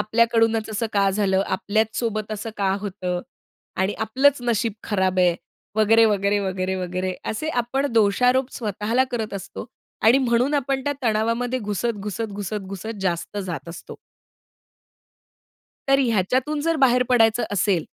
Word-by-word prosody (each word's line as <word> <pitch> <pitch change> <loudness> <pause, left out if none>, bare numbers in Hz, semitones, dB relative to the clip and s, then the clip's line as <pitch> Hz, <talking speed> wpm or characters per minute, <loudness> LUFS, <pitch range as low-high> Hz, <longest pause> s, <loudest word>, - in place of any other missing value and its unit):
आपल्याकडूनच 225 0 +2
असं 220 +2 -1
का 200 -1 +3
झालं, 195 -1 +1
आपल्याच 215 +3 -1
सोबत 215 -2 -2
असं 215 +2 -5
का 195 -2 +1
होतं 185 -3 -3 0.6
आणि 190 +2 +1
आपलंच 265 +6 +2
नशीब 235 -2 0
खराब 190 -3 0
आहे, 180 -1 +4 0.4
वगैरे, 225 +1 +5
वगैरे, 205 -1 +2
वगैरे, 190 -1 -2
वगैरे, 185 0 -3 0.2
असे 305 +9 -3
आपण 270 +4 -1
दोषारोप 250 +4 +3
स्वतःला 220 +3 0
करत 225 -4 -3
असतो 195 -1 -7 0.4
आणि 235 +5 +6
म्हणून 250 +2 +1
आपण 275 -1 0
त्या 290 - +1
तणावामध्ये 230 +2 0
घुसत, 210 +1 -2
घुसत, 210 +2 -4
घुसत, 205 +1 -4
घुसत 205 +3 -6
जास्त 180 +2 -2
जात 180 -3 -5
असतो. 170 - -9 1.9
तर 275 0 +5
ह्याच्यातून 255 +5 +1
जर 330 +2 +1
बाहेर 250 -3 +4
पडायचं 230 -2 +4
असेल, 190 -4 +1
220 Hz, 140 wpm, -23 LUFS, 195-240 Hz, 1.9 s, आणि